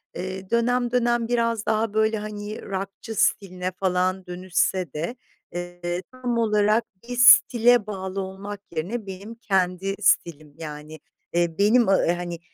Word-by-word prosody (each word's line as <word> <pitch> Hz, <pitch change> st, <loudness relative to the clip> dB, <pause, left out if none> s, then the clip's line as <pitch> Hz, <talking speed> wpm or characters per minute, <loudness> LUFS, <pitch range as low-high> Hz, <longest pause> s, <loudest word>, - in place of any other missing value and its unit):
eee, 190 Hz, +1 st, -6 dB
dönem 240 Hz, +1 st, +1 dB
dönem 240 Hz, -1 st, +1 dB
biraz 230 Hz, -2 st, 0 dB
daha 220 Hz, -1 st, 0 dB
böyle, 220 Hz, 0 st, +2 dB
hani, 210 Hz, 0 st, -6 dB
rockçı 195 Hz, +3 st, -6 dB
stiline 185 Hz, -3 st, 0 dB
falan 185 Hz, 0 st, -1 dB
dönüşse 180 Hz, -2 st, -1 dB
de, 165 Hz, +10 st, -3 dB, 0.4 s
eee, 175 Hz, 0 st, -4 dB
tam 250 Hz, -2 st, -3 dB
olarak 215 Hz, 0 st, +2 dB, 0.2 s
bir 245 Hz, +1 st, -6 dB
stile 245 Hz, -2 st, +6 dB
bağlı 190 Hz, -1 st, -4 dB
olmak 195 Hz, +2 st, -7 dB, 0.2 s
yerine 205 Hz, +8 st, -3 dB
benim 195 Hz, +4 st, -8 dB
kendi 195 Hz, -3 st, 0 dB
stilim, 155 Hz, -6 st, +1 dB
yani, 155 Hz, -1 st, -8 dB, 0.3 s
eee, 170 Hz, -1 st, +1 dB
benim, 220 Hz, +4 st, +4 dB
ı 190 Hz, -3 st, +3 dB
hani, 175 Hz, -1 st, -4 dB
195 Hz, 135 wpm, -24 LUFS, 180-225 Hz, 0.4 s, stile